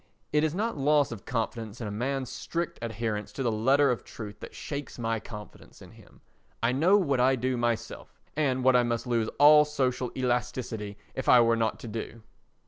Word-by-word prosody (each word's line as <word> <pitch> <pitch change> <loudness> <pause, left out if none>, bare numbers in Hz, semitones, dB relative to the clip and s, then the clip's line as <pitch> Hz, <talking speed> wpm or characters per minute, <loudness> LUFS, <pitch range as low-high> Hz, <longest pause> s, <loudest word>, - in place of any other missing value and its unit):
It 150 0 +3
is 155 +1 0
not 215 -4 -2
loss 145 -1 +3
of 110 -5 -8
confidence 115 -2 -3
in 115 - -4
a 105 - -4
man's 130 +4 -2
strict 170 0 -4
adherence 110 -2 -3
to 135 - -3
the 120 - +1
letter 135 +6 +3
of 120 - -3
truth 105 -2 -9
that - - -10
shakes 145 -1 -6
my 115 -1 -1
confidence 105 -1 -11
in - - -13
him. - - -19 0.4
I 115 - +3
know 165 +10 +4
what 140 -10 +1
I 130 +2 +4
do 130 +1 -1
myself 120 -1 -3 0.2
and 130 -4 0
what 130 0 +5
I 125 - +6
must 120 -1 -1
lose 115 -3 0
all 150 +1 +8
social 130 -4 -1
elasticity 120 -4 -2 0.2
if 130 - -3
I 125 - +8
were 115 0 +4
not 115 -1 0
to - - -7
do. 115 +1 -6
125 Hz, 200 wpm, -28 LUFS, 115-140 Hz, 0.4 s, all